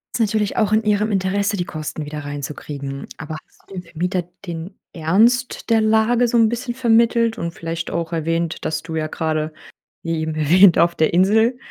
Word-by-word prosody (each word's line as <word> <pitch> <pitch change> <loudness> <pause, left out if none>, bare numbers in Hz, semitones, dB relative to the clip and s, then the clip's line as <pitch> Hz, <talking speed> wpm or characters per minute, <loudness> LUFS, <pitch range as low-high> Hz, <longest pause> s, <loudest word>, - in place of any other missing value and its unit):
Ist - - -2
natürlich 215 -2 0
auch 215 -1 +2
in 220 +1 +3
ihrem 210 0 +1
Interesse, 200 +1 0
die 180 - -1
Kosten 155 -2 -6
wieder 150 -1 -6
reinzukriegen. 140 -1 -6
Aber 155 0 -6
hast - - -28
du 195 - -10
dem 180 - -5
Vermieter 180 +2 -2 0.2
den 170 +2 -6 0.2
Ernst 225 +13 +1
der 225 -1 +4
Lage 220 +3 +3
so 235 - -2
'n 225 -1 +5
bisschen 240 +1 -3
vermittelt 230 -1 +2
und 170 0 -3
vielleicht 165 0 -5
auch 170 0 -3
erwähnt, 165 +1 -2
dass 155 0 -2
du 165 -1 -5
ja 155 0 -1
gerade 155 -1 -2 0.5
wie 165 -1 -2
eben 155 0 -3
erwähnt, 170 +5 +5
auf 170 0 +3
der 160 - +1
Insel 220 +7 +3
180 Hz, 190 wpm, -20 LUFS, 160-220 Hz, 0.5 s, n